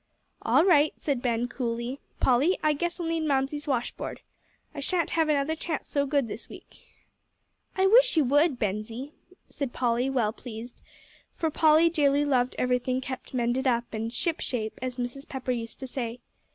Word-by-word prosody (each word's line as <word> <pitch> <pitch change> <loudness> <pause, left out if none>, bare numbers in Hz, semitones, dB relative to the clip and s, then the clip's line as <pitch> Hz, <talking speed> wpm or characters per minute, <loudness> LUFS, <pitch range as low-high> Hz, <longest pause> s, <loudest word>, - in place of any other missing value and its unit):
"All 320 - +4
right," 310 -5 +4
said 275 -5 -1
Ben, 240 -1 0
coolly. 240 +1 -3 0.2
"Polly, 270 +9 +3
I 305 -1 +4
guess 345 +4 -2
I'll 345 - -2
mend 325 -1 -1
Mamsie's 280 +2 0
washboard. 250 -4 -3 0.5
I 295 - -6
shan't 335 +3 0
have 320 -1 +2
another 295 +1 +1
chance 320 -1 -4
so 285 -1 0
good 280 -3 +1
this 220 - -7
week." - - -13 1.0
"I 380 - +4
wish - - +6
you 310 - +6
would, 290 +2 +3
Bensie," 225 +6 -3 0.4
said 275 -4 -4
Polly, 245 +1 +1
well 235 -5 +1
pleased, 235 0 -9 0.5
for 320 -1 -1
Polly 315 +2 +5
dearly 290 -3 +2
loved 255 -3 +1
everything 250 +1 +1
kept 260 0 -7
mended 245 +2 +1
up, 235 -2 0
and 225 +1 -3
"shipshape," 245 - -2
as 255 -1 -4
Mrs. 245 +3 -5
Pepper 260 -1 -3
used 230 -2 -4
to - - -4
say. 245 -2 -4
265 Hz, 165 wpm, -27 LUFS, 245-305 Hz, 1.0 s, wish